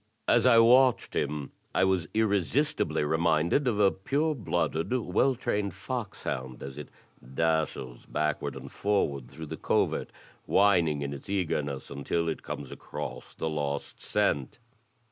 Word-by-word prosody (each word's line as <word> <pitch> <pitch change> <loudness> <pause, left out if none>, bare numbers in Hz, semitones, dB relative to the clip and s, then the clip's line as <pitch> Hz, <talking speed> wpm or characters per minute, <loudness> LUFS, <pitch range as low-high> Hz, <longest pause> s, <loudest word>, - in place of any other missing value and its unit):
As 120 +1 +4
I 120 -2 +7
watched 125 +2 +5
him 75 -2 -2 0.2
I - - +4
was 95 -3 +2
irresistibly 110 - +1
reminded 80 - +2
of 110 -4 +1
a 100 -2 +5
pure 145 +11 0
blooded, 95 - -1
well 130 +2 +2
trained 105 -6 -2
fox 110 +1 -5
hound 65 -1 -4
as 70 +1 -7
it 75 - -8 0.5
dashes 80 -6 -1
backward 75 -1 -1
and - - -9
forward 70 -11 0
through 80 - -8
the - - -6
covert, - - 0 0.4
whining 85 -7 +3
in 70 0 -3
its 70 - -9
eagerness, 75 -9 -2
imtil 80 +4 -1
it - - -6
comes 70 -2 -6
across - - -7
the - - -3
lost 70 -2 -3
scent. 70 -3 0
85 Hz, 145 wpm, -29 LUFS, 75-110 Hz, 0.5 s, I